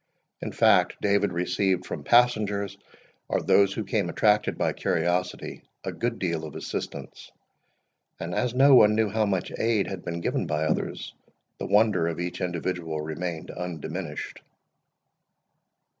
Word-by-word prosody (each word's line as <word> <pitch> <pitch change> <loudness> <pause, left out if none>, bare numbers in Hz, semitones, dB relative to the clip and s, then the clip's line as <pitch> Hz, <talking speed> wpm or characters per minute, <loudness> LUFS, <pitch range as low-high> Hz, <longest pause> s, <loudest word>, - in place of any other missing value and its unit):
In - - -4
fact, - - +4
David 100 0 +2
received 90 +2 0
from 75 - -6
passengers, 105 -1 +2 0.5
or - - +1
those 100 -1 +4
who 110 - -3
came 100 -2 -1
attracted 105 +5 +2
by - - 0
curiosity, 90 +2 -1 0.2
a - - -3
good 120 -1 -2
deal 85 -4 -2
of 75 -3 -8
assistance; - - -6 0.9
and 85 +1 -4
as 125 +5 -1
no 135 +2 +6
one 105 -4 +7
knew 110 -1 +2
how 110 +1 +1
much 95 -3 -1
aid 110 -3 +2
had 95 -3 -6
been 85 0 -4
given - - -1
by 75 +1 0
others, 75 - -2 0.5
the - - -4
wonder 105 -4 +3
of 85 0 -3
each 85 0 -4
individual 85 -2 -2
remained 80 +2 -4
undiminished. 85 -2 -6
95 Hz, 145 wpm, -26 LUFS, 85-105 Hz, 0.9 s, one